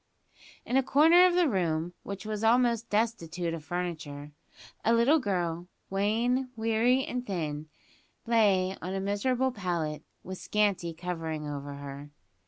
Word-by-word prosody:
In 250 - +1
a - - +5
corner 325 +7 +6
of 355 - +1
the 355 -2 +4
room, 175 - -1
which 200 0 -7
was 215 0 -3
almost 235 0 +3
destitute 175 -6 -1
of 165 -2 -6
furniture, 155 -3 -5 0.5
a 230 - +3
little 265 +8 +4
girl, 175 - -2 0.2
wan, 230 +6 +1
weary, 230 +4 +2
and 250 0 -3
thin, 155 -7 -4 0.6
lay 195 -5 +3
on 185 +3 -4
a - - -1
miserable 245 +7 0
pallet, 170 -8 -3 0.2
with 185 0 -7
scanty 200 -5 0
covering 160 -3 -4
over 145 -1 -5
her. 140 +1 -8
195 Hz, 140 wpm, -29 LUFS, 165-235 Hz, 0.6 s, corner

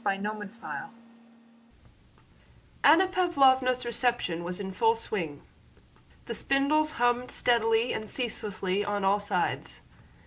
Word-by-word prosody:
CHAPTER 210 +2 -2 0.2
III - - -6 1.9
Anna 330 +6 +6
Pávlovna's 265 -9 +3
reception 235 -8 -1
was 180 +2 -5
in 190 -1 -5
full 225 +4 +2
swing. 175 -10 -5 0.8
The - - -5
spindles 305 +3 +1
hummed 245 +1 +1
steadily 230 0 +1
and 215 -1 -5
ceaselessly 205 -5 -2
on 205 -1 -2
all 200 +2 +3
sides. 205 - -2
230 Hz, 105 wpm, -28 LUFS, 205-260 Hz, 1.9 s, Anna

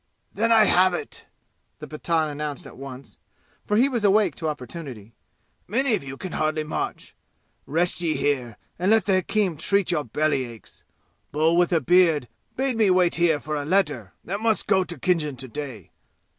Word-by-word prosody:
"Then 230 +3 +1
I 225 -1 +7
have 185 -2 +4
it!" - - -7 0.5
the - - -9
Pathan 160 +1 -1
announced 150 -1 -5
at - - -11
once, 135 0 -10 0.5
for 210 - +2
he 250 +4 +5
was 240 -5 -2
awake 205 -4 +4
to 160 - -3
opportunity. 125 -6 -8 0.5
"Many 245 +5 +1
of 210 - 0
you 135 0 -8
can 185 +3 -7
hardly 155 0 -1
march. 150 - -5 0.5
Rest 175 +4 +1
ye 160 -3 0
here 130 -5 -1 0.2
and 185 +2 +1
let 220 0 +4
the 195 - +2
hakim 190 -2 0
treat 190 +3 +1
your 155 -4 0
belly 145 +2 0
aches. 115 -2 -13 0.5
Bull 160 +3 +2
with 175 0 +3
a 170 - +3
beard 165 -3 +3 0.3
bade 260 -2 -1
me 215 -3 +4
wait 180 -1 +3
here 170 -3 +3
for 155 +1 -4
a 145 - -2
letter 150 - 0
that 200 +3 -4
must 220 -1 +1
go 190 -2 +3
to 175 -2 -6
Khinjan 150 -3 0
to 130 +1 -6
day. 125 - -7
165 Hz, 185 wpm, -24 LUFS, 145-195 Hz, 0.5 s, I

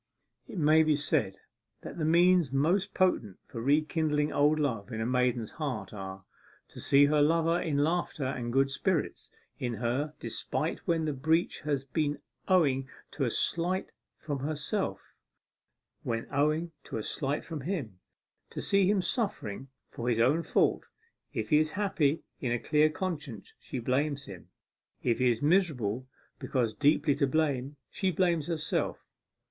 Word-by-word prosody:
It - - -8
may 155 0 +5
be 155 -1 +3
said 135 -9 0 0.4
that - - -8
the 155 - 0
means 170 -2 +4
most 165 +8 +1
potent 120 - +1
for 115 - -7
rekindling 150 +2 +1
old 150 +2 +3
love 125 -7 -1
in 110 - -4
a 110 - -1
maiden's 125 -2 0
heart 140 -10 -4
are, 95 -1 -7 0.4
to - - -9
see 140 +1 +5
her 150 +1 +3
lover 165 +3 +3
in 150 -3 -1
laughter 160 -3 -1
and 125 -3 -3
good 135 +2 +2
spirits 165 +3 -1 0.3
in 120 -2 -2
her 125 +7 -2
despite - - -3
when 165 -1 +1
the 150 - -1
breach 160 +6 +1
has 145 -3 -1
been 145 +2 -1 0.3
owing 140 -8 +3 0.2
to 145 -2 -1
a - - +1
slight 175 +9 0 0.3
from 145 -3 -4
herself; 155 +8 -3 0.9
when 115 -1 -3
owing 155 +4 +1
to - - -5
a 110 - -3
slight 140 +5 -2
from 160 -3 -5
him, 135 - -4 0.5
to - - -7
see 195 -1 +3
him 200 -3 +2
suffering 135 - -2 0.2
for 120 +1 -4
his 115 -2 +1
own 135 +8 +4
fault. - - +1 0.4
If - - -4
he 150 - +6
is 155 0 0
happy 165 -7 +1 0.2
in 125 - -2
a 120 - +2
clear 150 +5 +3
conscience, 155 - -5
she - - -6
blames 140 +3 0
him; 95 -4 -11 0.5
if 120 -1 +1
he 125 -1 +4
is 120 +2 -1
miserable 135 - +1 0.3
because 120 -5 -1
deeply 145 +4 +3
to 140 - +2
blame, 140 -2 0 0.2
she 190 - 0
blames 170 -3 +1
herself. 160 -3 -2
145 Hz, 160 wpm, -30 LUFS, 125-160 Hz, 0.9 s, he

